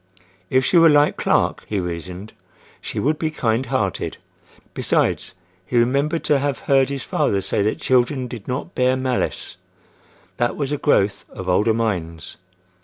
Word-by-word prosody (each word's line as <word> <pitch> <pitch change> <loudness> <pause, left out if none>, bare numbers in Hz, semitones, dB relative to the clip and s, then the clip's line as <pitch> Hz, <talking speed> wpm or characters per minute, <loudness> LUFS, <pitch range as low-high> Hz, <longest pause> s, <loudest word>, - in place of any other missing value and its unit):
If 130 0 +2
she 175 - +4
were 165 0 +7
like 145 0 +4
Clark, - - +1
he 105 - -1
reasoned, 90 +3 -6 0.5
she - - -7
would 150 +2 0
be 160 - 0
kind 120 -4 -1
hearted. 100 -9 -2 0.6
Besides, - - 0 0.3
he 120 +6 -2
remembered 140 +7 +1
to 145 - +2
have 140 -1 -1
heard 135 -1 +3
his 140 -2 -4
father 100 - 0
say 95 +2 -1
that 105 +2 0
children 130 +1 +1
did 115 -4 -9
not 130 +7 -4
bear 130 +1 +2
malice: 130 -1 -2 0.8
that 120 0 0
was 140 -1 -2
a 145 - -1
growth 100 -8 +1
of 95 - -8
older 105 +5 +2
minds. 85 -9 -3
125 Hz, 160 wpm, -21 LUFS, 100-140 Hz, 0.8 s, were